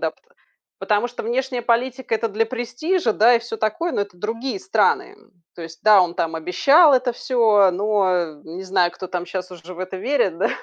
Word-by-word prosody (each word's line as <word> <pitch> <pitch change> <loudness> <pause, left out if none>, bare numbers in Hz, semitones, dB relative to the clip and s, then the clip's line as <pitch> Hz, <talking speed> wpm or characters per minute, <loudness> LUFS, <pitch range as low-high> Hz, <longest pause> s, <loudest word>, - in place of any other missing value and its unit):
да, - - -1
п - - -35 0.6
Потому 210 +2 0
что 245 - -8
внешняя 250 +2 -2
политика- 245 +1 -1
это 225 +1 -1
для 220 +2 0
престижа, 245 +5 -2
да, 230 +4 +4
и - - 0
всё 230 -1 -7
такое, 220 +11 -2
но - - -1
это 200 -3 -10
другие 230 +2 -4
страны, - - 0
м. - - -25 0.3
То 170 - -8
есть 165 0 -11
да, 210 -2 +6
он 175 -1 -3
там 165 -1 -2
обещал 275 - +4
это 255 -1 +1
всё, 220 -6 +3
но, 200 0 +1
э, 165 -4 -3
не 170 +4 -8
знаю, 185 -2 +1
кто 185 - -8
там 180 -1 -5
щас 185 0 -6
уже 180 0 -11
в - - -14
это 185 +1 -5
верит, 190 - -1
да. - - +1
215 Hz, 215 wpm, -21 LUFS, 185-245 Hz, 0.6 s, да